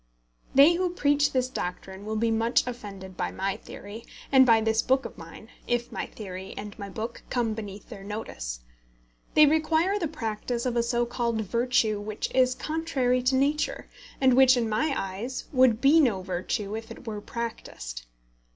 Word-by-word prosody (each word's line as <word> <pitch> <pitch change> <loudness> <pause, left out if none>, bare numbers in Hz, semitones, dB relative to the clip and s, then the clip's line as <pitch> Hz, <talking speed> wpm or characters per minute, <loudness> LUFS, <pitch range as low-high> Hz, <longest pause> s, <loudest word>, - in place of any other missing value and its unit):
They 285 +5 +8
who 365 +1 0
preach 290 -2 +3
this 255 -1 +1
doctrine 190 -3 -6
will 220 - -2
be 225 +1 +1
much 225 +2 +2
offended 200 -6 -7
by - - -2
my 195 +1 -2
theory, 215 0 -10 0.3
and 260 -1 +7
by 225 -1 +6
this 220 0 +2
book 265 +1 +1
of - - -7
mine, - - -12 0.2
if 240 0 -1
my - - -4
theory 190 -2 -8
and 205 0 -6
my 200 -1 -6
book 225 +4 -5
come 235 -3 0
beneath 205 -2 -8
their 195 - -9
notice. - - -5 0.7
They 305 - +9
require 320 +6 +2
the 335 - 0
practice 235 -4 -3
of 245 -1 -1
a 235 - +3
so 240 0 0
called 235 -2 -1
virtue 230 0 +1
which 210 +1 -4
is 255 -1 +3
contrary 275 -5 0
to 255 +1 +2
nature, 285 +3 0 0.3
and 265 -2 +5
which, 260 0 +6
in 235 -2 +1
my 220 +8 +1
eyes, 195 +7 -4
would 255 -4 +5
be 285 +4 +6
no 220 -11 +2
virtue 195 +3 -3
if 225 +1 -7
it 230 - -11
were 210 -2 -5
practised. - - -6
235 Hz, 180 wpm, -27 LUFS, 210-260 Hz, 0.7 s, They